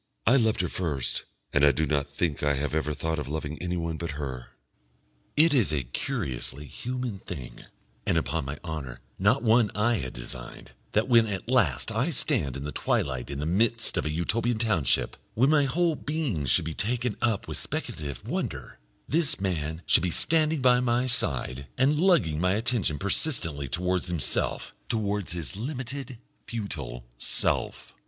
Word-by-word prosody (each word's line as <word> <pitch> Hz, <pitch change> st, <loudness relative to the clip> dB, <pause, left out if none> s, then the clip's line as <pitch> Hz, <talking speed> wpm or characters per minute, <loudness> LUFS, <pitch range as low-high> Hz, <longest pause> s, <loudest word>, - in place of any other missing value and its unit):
"I 120 Hz, -, +5 dB
loved 110 Hz, -6 st, +3 dB
her 90 Hz, -, 0 dB
first, 75 Hz, -10 st, -2 dB, 0.3 s
and 70 Hz, -, +3 dB
I 75 Hz, -, +8 dB
do 80 Hz, +4 st, 0 dB
not 70 Hz, -1 st, 0 dB
think 70 Hz, +1 st, -1 dB
I 75 Hz, -1 st, +2 dB
have 70 Hz, +1 st, -2 dB
ever 75 Hz, -1 st, 0 dB
thought 80 Hz, +2 st, -2 dB
of 75 Hz, -, -4 dB
loving 75 Hz, +1 st, -4 dB
anyone 85 Hz, -2 st, -2 dB
but 85 Hz, -1 st, -4 dB
her." 65 Hz, -4 st, -6 dB, 0.8 s
It 160 Hz, +1 st, +6 dB
is 120 Hz, -, +4 dB
a 75 Hz, -3 st, 0 dB
curiously 65 Hz, +3 st, -2 dB
human 125 Hz, -, -4 dB
thing, 70 Hz, -10 st, -8 dB, 0.4 s
and, -, -, +1 dB
upon 80 Hz, -4 st, -1 dB
my 70 Hz, +2 st, -4 dB
honour, 75 Hz, -7 st, -5 dB, 0.2 s
not 100 Hz, +8 st, +3 dB
one 115 Hz, -1 st, +4 dB
I 115 Hz, +3 st, +2 dB
had 65 Hz, -8 st, -4 dB
designed, -, -, -8 dB, 0.2 s
that 110 Hz, +3 st, +2 dB
when 115 Hz, -3 st, +5 dB
at 100 Hz, 0 st, -4 dB
last 125 Hz, -2 st, +2 dB
I 120 Hz, +8 st, +1 dB
stand 120 Hz, -, 0 dB
in 70 Hz, -, -6 dB
the 75 Hz, -, -4 dB
twilight 65 Hz, -4 st, -1 dB
in 70 Hz, -, -4 dB
the 75 Hz, -, -2 dB
midst 115 Hz, +7 st, +2 dB
of -, -, 0 dB
a -, -, -1 dB
Utopian 115 Hz, +9 st, 0 dB
township, 105 Hz, -, +1 dB, 0.2 s
when 130 Hz, +6 st, +4 dB
my 145 Hz, -2 st, +4 dB
whole 165 Hz, +4 st, +1 dB
being 140 Hz, -, -2 dB
should -, -, +3 dB
be 80 Hz, -, -3 dB
taken 120 Hz, +4 st, 0 dB
up 115 Hz, -4 st, +1 dB
with -, -, -3 dB
speculative 70 Hz, -5 st, -4 dB
wonder, -, -, -4 dB, 0.3 s
this 155 Hz, -5 st, +1 dB
man 80 Hz, -3 st, -2 dB
should -, -, +6 dB
be 90 Hz, -, 0 dB
standing 155 Hz, -, +2 dB
by 125 Hz, -1 st, +6 dB
my 125 Hz, 0 st, +1 dB
side, 70 Hz, -, 0 dB
and 140 Hz, +4 st, +3 dB
lugging 160 Hz, -, +3 dB
my 90 Hz, 0 st, +3 dB
attention 110 Hz, -, +1 dB
persistently 95 Hz, -, +1 dB
towards 90 Hz, +7 st, -1 dB
himself, 85 Hz, -7 st, +1 dB, 0.2 s
towards 105 Hz, -5 st, -1 dB
his 80 Hz, -7 st, -5 dB
limited 130 Hz, +1 st, -5 dB, 0.3 s
futile 70 Hz, -, -5 dB
self. -, -, -1 dB
90 Hz, 170 wpm, -27 LUFS, 75-120 Hz, 0.8 s, I